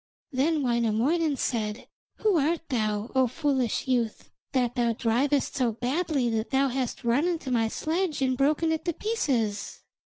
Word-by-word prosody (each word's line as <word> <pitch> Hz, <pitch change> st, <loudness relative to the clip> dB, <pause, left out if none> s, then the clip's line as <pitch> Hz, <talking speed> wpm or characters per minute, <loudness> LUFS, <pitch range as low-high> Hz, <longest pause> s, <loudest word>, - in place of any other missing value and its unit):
Then 295 Hz, +3 st, +1 dB
Wainamoinen 245 Hz, +6 st, +1 dB
said: 220 Hz, -3 st, -2 dB, 0.3 s
'Who 425 Hz, -5 st, +2 dB
art 325 Hz, +3 st, 0 dB
thou, 215 Hz, -3 st, -1 dB
O 260 Hz, -1 st, +4 dB
foolish 265 Hz, -3 st, -1 dB
youth, 240 Hz, -4 st, -1 dB, 0.2 s
that 250 Hz, -3 st, +1 dB
thou 240 Hz, -2 st, +1 dB
drivest 255 Hz, +6 st, +1 dB
so 245 Hz, -4 st, +1 dB
badly 270 Hz, +3 st, 0 dB
that 220 Hz, 0 st, -1 dB
thou 270 Hz, 0 st, +2 dB
hast 255 Hz, 0 st, -3 dB
run 245 Hz, +8 st, +2 dB
into 330 Hz, -7 st, -2 dB
my 230 Hz, -2 st, +2 dB
sledge 320 Hz, +6 st, -1 dB
and 260 Hz, -1 st, +1 dB
broken 300 Hz, +5 st, +2 dB
it 320 Hz, 0 st, -1 dB
to 340 Hz, -, 0 dB
pieces?' 245 Hz, -, -1 dB
260 Hz, 155 wpm, -27 LUFS, 235-305 Hz, 0.3 s, O